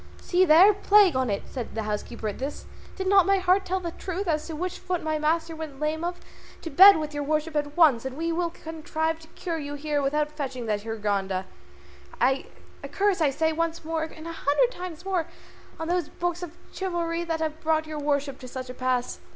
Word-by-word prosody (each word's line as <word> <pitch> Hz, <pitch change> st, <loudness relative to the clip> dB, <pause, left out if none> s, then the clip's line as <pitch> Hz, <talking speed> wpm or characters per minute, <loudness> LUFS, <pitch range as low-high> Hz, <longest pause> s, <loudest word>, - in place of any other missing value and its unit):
"See 365 Hz, +1 st, +2 dB
there! 360 Hz, +6 st, +7 dB
plague 405 Hz, -4 st, +5 dB
on 260 Hz, -2 st, +1 dB
it!" 200 Hz, -, -1 dB
cried 245 Hz, -5 st, -5 dB
the 220 Hz, -, -2 dB
housekeeper 215 Hz, +2 st, -4 dB
at 205 Hz, -, -4 dB
this: 275 Hz, +3 st, -5 dB, 0.3 s
"did 380 Hz, -, -4 dB
not 385 Hz, -1 st, +5 dB
my 395 Hz, 0 st, +4 dB
heart 375 Hz, +1 st, +2 dB
tell 375 Hz, +1 st, -1 dB
the 345 Hz, -2 st, -4 dB
truth 375 Hz, +3 st, -4 dB
as 305 Hz, -2 st, 0 dB
to 320 Hz, -, -5 dB
which 360 Hz, +3 st, -4 dB
foot 360 Hz, -2 st, -3 dB
my 310 Hz, -1 st, -1 dB
master 325 Hz, +2 st, 0 dB
went 310 Hz, -4 st, -7 dB
lame 310 Hz, +2 st, -1 dB
of? 350 Hz, +1 st, -3 dB, 0.4 s
To 330 Hz, -, -5 dB
bed 385 Hz, +6 st, +9 dB
with 305 Hz, -1 st, -4 dB
your 290 Hz, -, -2 dB
worship 305 Hz, +2 st, -1 dB
at 290 Hz, +1 st, -2 dB
once, 290 Hz, -9 st, +5 dB
and 265 Hz, +1 st, -5 dB
we 330 Hz, +1 st, -1 dB
will 340 Hz, +1 st, 0 dB
contrive 320 Hz, 0 st, -3 dB
to 320 Hz, -, -15 dB
cure 335 Hz, -3 st, -3 dB
you 290 Hz, -1 st, -5 dB
here 290 Hz, 0 st, -1 dB
without 300 Hz, +2 st, 0 dB
fetching 270 Hz, -5 st, -5 dB
that 210 Hz, -2 st, -1 dB
Hurgada. 200 Hz, -4 st, -2 dB, 0.7 s
A 265 Hz, +2 st, +2 dB, 0.5 s
curse 395 Hz, -3 st, +1 dB
I 305 Hz, -, +4 dB
say 320 Hz, +4 st, 0 dB
once 330 Hz, 0 st, -2 dB
more, 325 Hz, 0 st, -1 dB
and 320 Hz, 0 st, -7 dB
a -, -, -4 dB
hundred 325 Hz, -, +2 dB
times 360 Hz, -5 st, -8 dB
more, 365 Hz, -4 st, 0 dB, 0.5 s
on 325 Hz, -, -3 dB
those 350 Hz, -2 st, 0 dB
books 350 Hz, 0 st, -3 dB
of 350 Hz, -1 st, -8 dB, 0.2 s
chivalry 345 Hz, -3 st, -2 dB
that 330 Hz, -1 st, -2 dB
have 315 Hz, -1 st, -3 dB
brought 315 Hz, 0 st, +1 dB
your 310 Hz, -1 st, -5 dB
worship 285 Hz, -2 st, -1 dB
to 255 Hz, -, -9 dB
such 255 Hz, 0 st, -6 dB
a -, -, -8 dB
pass." 255 Hz, -1 st, -1 dB
315 Hz, 215 wpm, -26 LUFS, 280-345 Hz, 0.7 s, bed